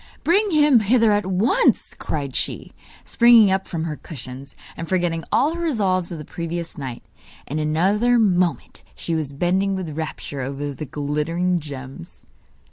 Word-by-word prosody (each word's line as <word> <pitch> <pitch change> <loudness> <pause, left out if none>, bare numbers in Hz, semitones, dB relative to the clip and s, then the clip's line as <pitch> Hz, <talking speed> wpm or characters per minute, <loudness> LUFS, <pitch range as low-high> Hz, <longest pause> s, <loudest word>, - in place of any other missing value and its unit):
'Bring 395 +8 +3
him 295 -6 +5
hither 225 +1 +3
at 205 -2 +1
once!' 215 - +2
cried 140 -4 -4
she, - - -3 0.3
springing 235 -4 +6
up 190 0 0
from 165 -2 -3
her 160 -2 -3
cushions, 135 -2 -9 0.2
and 165 - -7
forgetting 175 -3 0
all 290 +6 +2
her 340 - -5
resolves 195 - 0
of 170 - -5
the 150 - -8
previous 170 0 -5
night. 130 -4 -6 0.4
In 150 +3 -3
another 195 +11 +2
moment 180 - +1
she 170 - -4
was 155 -4 -2
bending 190 +6 +1
with 170 -6 -5
rapture 155 -3 -5
over 140 +2 -4
the 150 - -6
glittering 150 +6 -1
gems. 135 - -10
175 Hz, 155 wpm, -22 LUFS, 150-210 Hz, 0.4 s, springing